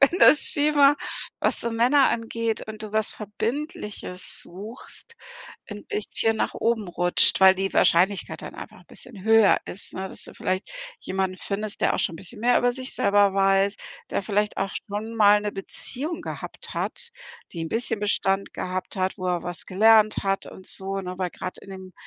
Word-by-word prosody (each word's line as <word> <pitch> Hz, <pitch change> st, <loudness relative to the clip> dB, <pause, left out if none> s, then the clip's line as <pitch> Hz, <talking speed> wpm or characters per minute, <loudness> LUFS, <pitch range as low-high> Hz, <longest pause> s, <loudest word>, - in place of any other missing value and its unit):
wenn 335 Hz, +6 st, +4 dB
das 300 Hz, -, +8 dB
Schema, 290 Hz, -1 st, +5 dB, 0.5 s
was -, -, 0 dB
so 235 Hz, -, -2 dB
Männer 250 Hz, +5 st, +3 dB
angeht 230 Hz, -1 st, -3 dB
und 215 Hz, 0 st, -7 dB
du 215 Hz, -1 st, -8 dB
was 220 Hz, 0 st, +1 dB
Verbindliches 210 Hz, -, -5 dB
suchst, 215 Hz, -, -10 dB, 0.6 s
'n 205 Hz, 0 st, -8 dB
bisschen 220 Hz, +1 st, +1 dB
nach -, -, -2 dB
oben 225 Hz, -2 st, -1 dB
rutscht, 175 Hz, +2 st, +4 dB
weil 190 Hz, 0 st, +7 dB
die 195 Hz, 0 st, -2 dB
Wahrscheinlichkeit 185 Hz, +3 st, +2 dB
dann -, -, -8 dB
einfach -, -, -10 dB
'n -, -, -22 dB
bisschen 220 Hz, -7 st, -3 dB
höher 220 Hz, -2 st, +5 dB
ist, 190 Hz, -, 0 dB
ne, 190 Hz, +1 st, -4 dB
dass -, -, -4 dB
du -, -, -8 dB
vielleicht 185 Hz, -, -3 dB, 0.3 s
jemanden 190 Hz, 0 st, -3 dB
findest, 210 Hz, +1 st, -4 dB
der -, -, +2 dB
auch -, -, -2 dB
schon -, -, 0 dB
'n -, -, -8 dB
bisschen 190 Hz, +3 st, -5 dB
mehr 245 Hz, +2 st, +3 dB
über 245 Hz, 0 st, +1 dB
sich 260 Hz, +1 st, -4 dB
selber 200 Hz, -1 st, +3 dB
weiß, 195 Hz, +1 st, +2 dB, 0.3 s
der -, -, -1 dB
vielleicht 210 Hz, +1 st, -1 dB
auch 195 Hz, 0 st, -2 dB, 0.2 s
schon 215 Hz, +3 st, -5 dB
mal 210 Hz, -1 st, +5 dB
'ne 210 Hz, 0 st, -3 dB
Beziehung 280 Hz, -, -2 dB
gehabt -, -, -7 dB
hat, 475 Hz, -, -2 dB, 0.4 s
die 170 Hz, -, -6 dB
'n 165 Hz, -, -4 dB
bisschen 225 Hz, +1 st, 0 dB
Bestand 195 Hz, -1 st, +1 dB
gehabt 185 Hz, +2 st, -4 dB
hat, 185 Hz, 0 st, -1 dB
wo 185 Hz, -, -4 dB
er 180 Hz, -1 st, -1 dB
was 175 Hz, 0 st, -4 dB
gelernt 215 Hz, +2 st, +4 dB
hat 195 Hz, 0 st, -1 dB
und 185 Hz, -, -12 dB
so, 195 Hz, 0 st, -2 dB
ne? 180 Hz, -1 st, -6 dB
Weil 180 Hz, -2 st, -2 dB
grad 185 Hz, -, -7 dB
in 195 Hz, -, -14 dB
dem 190 Hz, -1 st, -10 dB
205 Hz, 190 wpm, -24 LUFS, 190-225 Hz, 0.6 s, das